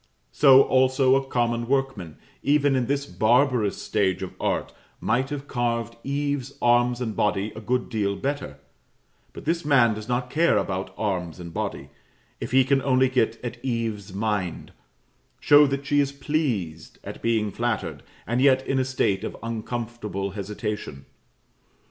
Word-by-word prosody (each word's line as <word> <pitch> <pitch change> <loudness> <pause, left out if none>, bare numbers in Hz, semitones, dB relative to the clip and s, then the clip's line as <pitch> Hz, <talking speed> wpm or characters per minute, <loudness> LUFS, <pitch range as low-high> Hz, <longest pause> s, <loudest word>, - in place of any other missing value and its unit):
So 135 -2 +7
also 130 0 +3
a 135 - +2
common 120 -3 -1
workman, 135 - -1 0.2
even 145 -1 +3
in 125 -2 0
this 140 +1 -1
barbarous 125 -3 +2
stage 95 -3 0
of 95 - -6
art, - - -1 0.3
might 125 +4 0
have 145 -1 -5
carved 115 -2 -2
Eve's 140 -1 -2
arms 120 +1 +3
and 110 -4 -3
body 105 0 0
a 110 - -7
good 125 +3 -1
deal 100 -3 -1
better; 140 +6 -4 0.7
but - - -11
this 165 +2 0
man 130 -6 +4
does 105 +2 -8
not 125 +1 -1
care 165 +3 +3
about 95 0 -2
arms 90 -6 -2
and 85 -2 -8
body, - - -4 0.5
if - - -5
he 130 0 +5
can 135 +1 +2
only 130 -1 +3
get 115 -3 0
at 120 0 -6
Eve's 115 -5 -3
mind 100 -3 -2 0.7
show 145 0 +6
that 140 +1 -3
she 145 +1 +2
is 140 -1 +1
pleased 135 - -3
at - - -8
being 110 -3 0
flattered, 105 -12 -2 0.2
and 120 +2 0
yet 130 -1 +4
in 135 - 0
a - - +2
state 105 -6 0
of - - -5
uncomfortable 115 -3 -4
hesitation. 105 - -5
120 Hz, 155 wpm, -25 LUFS, 105-135 Hz, 0.7 s, So